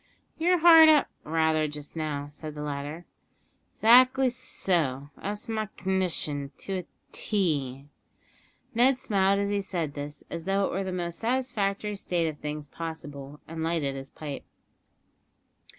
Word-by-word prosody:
"You're 355 +3 +4
hard 325 -1 +9
up, 300 -2 +5
rather, 160 0 +1
just 150 +1 -8
now?" 150 -3 -3
said 150 0 -8
the 150 - -5
latter. 145 +3 -5 0.7
"'Xactly 255 +3 +6
so, 150 - -1
that's 205 +3 -5
my 220 -1 -2
c'ndition 175 -7 -1
to 190 -1 -4
a 180 - -8 0.3
tee." 145 - -1 0.9
Ned 250 +3 +4
smiled 200 -5 +2
as 200 0 0
he 205 -1 +1
said 170 -6 -3
this, 145 0 -7
as 170 -1 -6
though 195 +1 +2
it - - -2
were 195 +2 -1
the 190 - -3
most 175 -2 -4
satisfactory 215 -4 -1
state 175 -4 -1
of 150 -2 -5
things 150 0 -5
possible, 145 -3 -7
and 165 0 -6
lighted 160 -4 0
his 135 0 -7
pipe. 145 -3 -7
170 Hz, 145 wpm, -27 LUFS, 150-205 Hz, 0.9 s, hard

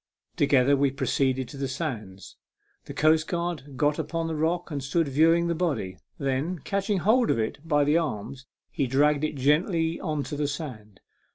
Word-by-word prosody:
Together 140 -1 +4
we 140 0 +2
proceeded 130 -1 0
to 130 - -10
the 135 0 -2
sands. 115 - -6 0.5
The - - -8
coastguard 155 -2 0
got 145 +2 +1
upon 165 +2 -2
the 165 -1 -3
rock 170 +3 -1
and 140 -3 -3
stood 155 +4 0
view 155 +4 +4
ing 170 +1 +2
the 170 - 0
body. 140 - -2 0.2
Then, 140 +6 -1
catching 200 +1 -1
hold 220 +7 +3
of - - +2
it 110 +3 -2
by 150 -3 +2
the 150 +3 +3
arms, 135 -2 -5 0.2
he 140 - -1
dragged 145 +3 +2
it 155 - -1
gently 160 +4 +1
on 150 -4 -2
to 150 - -5
the 145 0 -1
sand. 120 - -7
145 Hz, 180 wpm, -26 LUFS, 135-165 Hz, 0.5 s, Together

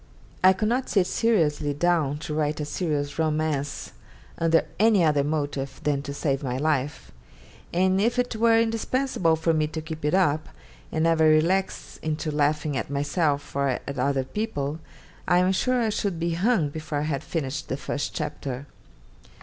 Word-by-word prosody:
I 185 0 +8
could 215 +3 -1
not 250 +3 0
sit 195 -4 +3
seriously 155 -11 +1
down 155 -3 +1
to 155 -2 -4
write 150 0 0
a 150 - -2
serious 145 -2 -2
romance 155 -2 -1 0.5
under 165 0 +3
any 215 -4 +5
other 150 -3 +3
motive 145 -2 -3
than 145 -2 +1
to 140 - -6
save 140 -1 -1
my 130 -3 -2
life; 145 -1 -1 0.6
and 185 +2 +2
if 235 +3 +1
it 245 -1 0
were 225 0 +4
indispensable 225 -5 +1
for 165 +1 +1
me 155 -1 +1
to 160 +1 -5
keep 160 -1 -7
it 150 +4 +2
up 155 -5 +2 0.4
and 160 - 0
never 165 -1 +4
relax 165 +5 +2
into 155 0 -2
laughing 150 0 0
at 130 - -3
myself 145 +1 -1
or 140 -2 +1
at 140 -2 -4
other 135 +1 +1
people, 155 - -3 0.5
I 175 - +4
am 180 +1 +3
sure 255 +6 +1
I 225 -2 +1
should 200 -5 -2
be 170 +1 0
hung 180 -3 +2
before 155 0 -4
I - - 0
had 150 -2 -2
finished 150 -3 -3
the 130 - -2
first 145 +1 -4
chapter. 140 -2 -4
155 Hz, 175 wpm, -25 LUFS, 145-185 Hz, 0.6 s, I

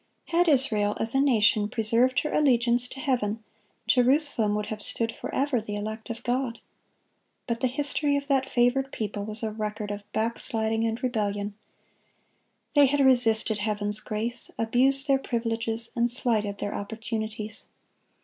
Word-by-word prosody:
Had 345 +1 +2
Israel 220 -8 +2
as 225 +1 +1
a 270 - +3
nation 215 -5 +3
preserved 235 +4 +1
her 300 - -4
allegiance 245 -4 +2
to 270 - -10
Heaven, 230 -6 -1 0.4
Jerusalem 250 -4 +4
would 210 0 -2
have 215 0 -6
stood 225 +2 -2
forever, 270 -3 -2
the 210 -1 -5
elect 215 +3 -6
of 230 0 -6
God.(9) 245 -1 -2 0.9
But 235 -2 -2
the 255 - +1
history 285 +2 +1
of 280 0 -5
that 270 -2 +1
favored 255 +3 +1
people 205 -2 -4
was 215 +1 -4
a 220 - -1
record 210 -1 -4
of 205 0 -5
backsliding 225 0 0
and 225 +2 -4
rebellion. 205 -4 -2 1.2
They 290 -2 +6
had 285 +2 0
resisted 225 -5 +3
Heaven's 210 0 0
grace, 225 +3 -3
abused 265 +5 +3
their 270 -1 +3
privileges, 230 -2 -2
and 240 0 +1
slighted 220 -5 0
their 205 - -4
opportunities. 220 0 -5
230 Hz, 150 wpm, -26 LUFS, 215-260 Hz, 1.2 s, They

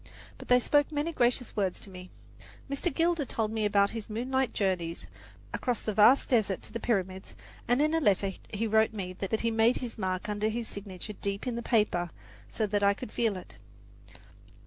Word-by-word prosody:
But - - -10
they 250 0 +6
spoke 290 +4 +2
many 300 +2 -1
gracious 245 -2 +1
words 195 -3 0
to 195 - -10
me. 180 0 -10 0.6
Mr. 280 +5 -1
Gilder 330 +1 +1
told 225 -4 -2
me 220 -1 0
about 200 -1 +3
his 225 -2 -6
moonlight 255 +4 0
journeys 180 -4 -1 0.5
across 245 -2 -1
the 215 - -2
vast 220 +6 +6
desert 210 -7 +1
to - - -9
the 230 - -3
Pyramids, 190 -5 -2 0.3
and 245 +4 +3
in 310 +1 +1
a 325 - +3
letter 200 - +2 0.2
he 215 +2 -1
wrote 220 0 +3
me 185 -3 -5 0.2
he 230 - 0
made 225 +2 +3
his 240 -3 -6
mark 185 +1 -2
under 210 +1 0
his 230 +1 -3
signature 200 0 -7
deep 200 +1 -4
in 250 -2 -2
the 235 - -3
paper 210 -8 +1 0.4
so 220 - -1
that 205 0 0
I 200 0 +4
could 210 - -8
feel 225 -5 0
it. 180 - -11
220 Hz, 190 wpm, -29 LUFS, 200-245 Hz, 0.6 s, they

